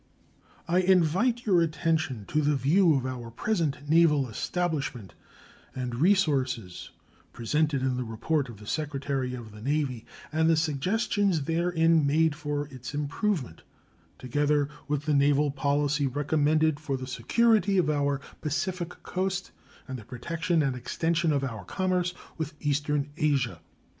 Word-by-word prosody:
I 175 +2 +3
invite 190 +7 +2
your 185 -5 +4
attention 155 -7 -1
to 155 - +1
the 150 0 +2
view 160 +5 +4
of 130 -2 -1
our 125 -3 -5
present 150 - -2
naval 150 -4 +4
establishment 140 - -3 0.6
and 125 -2 -3
resources 135 - +1 0.4
presented 140 +3 0
in 130 -1 0
the 125 - -1
report 125 +5 -1
of 115 - -10
the 105 - -13
Secretary 140 -2 -2
of 115 -3 -9
the 105 0 -12
Navy, 135 -3 -1 0.2
and 160 +1 +2
the 165 - +4
suggestions 180 - +1
therein 165 -1 +2
made 160 +2 +3
for 145 -1 -3
its 130 +2 -7
improvement, 145 - -2 0.6
together 145 +3 +1 0.2
with 150 0 -2
the 155 - +1
naval 145 +1 +3
policy 145 +1 +1
recommended 150 +2 +1
for 140 -3 -2
the 130 - -6
security 200 - +2
of 180 - +3
our 145 -2 +1 0.2
Pacific 175 +3 -3
Coast 190 0 -2 0.4
and 130 -2 -5
the - - -11
protection 165 +7 -1
and 135 -2 0
extension 165 +6 0
of 140 -2 +1
our 115 -5 -4
commerce 180 -2 -1 0.2
with 160 0 -4
eastern 145 0 -1
Asia. 140 -5 0
150 Hz, 140 wpm, -28 LUFS, 135-165 Hz, 0.6 s, your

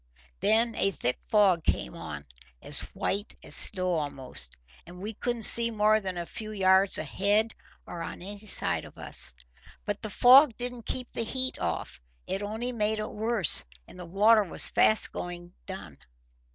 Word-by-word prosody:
Then 225 +4 +2
a 195 - +1
thick 125 -9 -3
fog 195 -6 +2
came - - -2
on, 70 -1 -8 0.3
as - - +1 0.2
white 205 +2 -3
as - - -3
snow 185 -4 +2
a'most, 130 - -5 0.3
and 175 +1 -14
we 210 +4 -6
couldn't 240 +1 -4
see 235 +1 +5
more 215 -1 +2
than 190 -3 -6
a 170 - -4
few 215 +4 -8
yards 190 -1 +3
ahead 210 +3 -1 0.3
or 170 - -8
on 165 - -6
any 205 +2 -8
side - - +3
of - - -15
us. - - -2 0.5
But 205 0 -4
the 215 - -6
fog 255 +3 +6
didn't 245 -2 -5
keep 250 -1 -4
the 230 - -3
heat 260 +3 -3
off; - - -5 0.2
it 195 - -4
only 220 +4 -4
made 215 -2 -1
it 215 0 -5
worse, 215 -5 +3 0.2
and - - -15
the 180 - -9
water 210 +5 +3
was 185 - +7
fast 215 - +2
going 175 0 -8
done. 190 - -9
205 Hz, 170 wpm, -27 LUFS, 180-225 Hz, 0.5 s, was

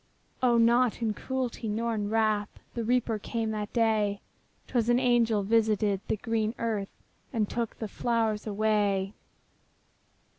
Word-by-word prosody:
O, 245 -2 +4
not 235 +1 +3
in 220 -2 +1
cruelty, 250 -1 -3
not 230 +3 -1
in 205 -2 -2
wrath, 215 -2 +1 0.2
The 235 - -3
Reaper 235 -2 +1
came 225 +1 -2
that 210 -1 -4
day; 215 -3 +1 0.5
'Twas 240 -2 0
an 240 - +5
angel 235 -4 +3
visited 210 -2 +2
the - - 0
green 225 +1 -1
earth, 215 -4 -2 0.4
And 220 -4 0
took 235 0 -3
the 220 - -4
flowers 225 -1 -1
away. 205 -2 +1
220 Hz, 140 wpm, -28 LUFS, 210-235 Hz, 0.5 s, an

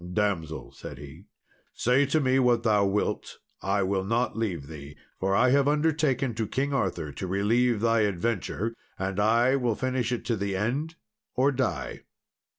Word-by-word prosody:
"Damsel," 80 - -1
said - - -9
he, 70 -2 -11 0.5
"say 130 +4 +3
to 155 +3 +2
me 130 -2 +2
what 120 -2 +3
thou 105 -3 +3
wilt, 100 +2 -2 0.2
I 100 +1 +1
will 95 0 0
not 115 +5 0
leave 95 -10 -2
thee; 75 -1 -10 0.2
for 95 +1 +1
I 125 +5 +4
have 140 0 +4
undertaken 145 -4 +1
to 110 0 -2
King 140 +5 -1
Arthur 90 - -1
to 95 - -5
relieve 110 +4 +2
thy 115 0 +3
adventure, 105 +1 -1 0.2
and 95 +1 -2
I 115 +5 +4
will 120 -4 0
finish 130 -1 -1
it 120 - -3
to 115 - 0
the 100 -1 -2
end, 135 +11 -2 0.4
or 135 +3 +3
die." 130 -1 -2
115 Hz, 165 wpm, -27 LUFS, 95-130 Hz, 0.5 s, I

